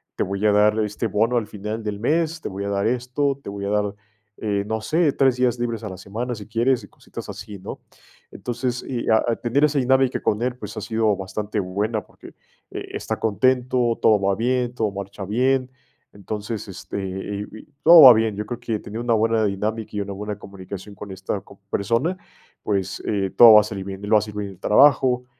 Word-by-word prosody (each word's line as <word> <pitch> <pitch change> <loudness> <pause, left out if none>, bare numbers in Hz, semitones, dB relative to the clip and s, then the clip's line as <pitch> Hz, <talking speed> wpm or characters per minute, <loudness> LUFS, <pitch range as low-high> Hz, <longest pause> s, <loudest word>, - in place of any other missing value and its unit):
te - - 0
voy 100 +2 -3
a 105 - +5
dar 105 +1 +4
este 105 +2 -1
bono 110 +4 +1
al 110 -3 -1
final 105 +3 -5
del 105 -2 -4
mes, 160 +5 0
te - - -4
voy 100 0 -5
a - - -2
dar 100 0 0
esto, 125 +3 -1
te - - -8
voy 100 0 -6
a - - -2
dar, 105 0 0 0.4
eh, 100 -2 -1
no 110 0 -2
sé, 155 +4 +1
3 130 -2 +2
días 125 -1 +1
libres 115 -2 -3
a - - -4
la 95 - -7
semana, 115 +7 -4
si 105 -2 -9
quieres, 120 +3 +1
y - - -13
cositas - - -10
así, 105 -1 -8
¿no? 95 - -8 0.5
Entonces, 125 +1 -3
y, 125 -3 -4
a 110 - +4
a 115 - +1
tener 125 +5 0
esa 150 -1 +3
dinámica 130 0 +2
con 105 +1 0
él, 125 0 -1
pues 105 -4 -8
ha - - -5
sido 110 -2 +1
bastante 100 +2 -3
buena, 105 +3 -2
porque, - - -15 0.4
eh, - - -6
está - - -4
contento, 125 +1 +1
todo 110 -2 +5
va 100 0 +1
bien, 125 +2 0
todo 110 -4 0
marcha 100 0 -7
bien. 130 +5 +1 0.4
Entonces, 105 +2 -5
este, 95 0 -7
eh, 100 +2 -5
y 110 - -11 0.2
todo 165 0 +10
va 130 -2 +12
bien. 110 -2 +1
Yo 105 +1 -4
creo 120 +2 -6
que 115 -3 -3
tener 110 +2 -7
una 120 0 +1
buena 110 0 +2
dinámica 105 +2 -3
y 105 - -1
una 100 0 -5
buena 105 +1 -5
comunicación 100 +1 -9
con 100 0 -9
esta, 95 +1 -4
co 100 - -18
persona, 115 - 0 0.5
pues, 95 -2 -2
eh, 100 -2 0
todo 115 -2 +10
va 105 - +9
a - - -3
salir 100 -2 -6
bien, 95 0 -7
él 105 - -5
va 110 - +7
a - - +5
hacer 105 0 -6
bien 105 -1 -4
el 95 - -16
trabajo, 125 +1 +4
110 Hz, 220 wpm, -22 LUFS, 100-125 Hz, 0.5 s, va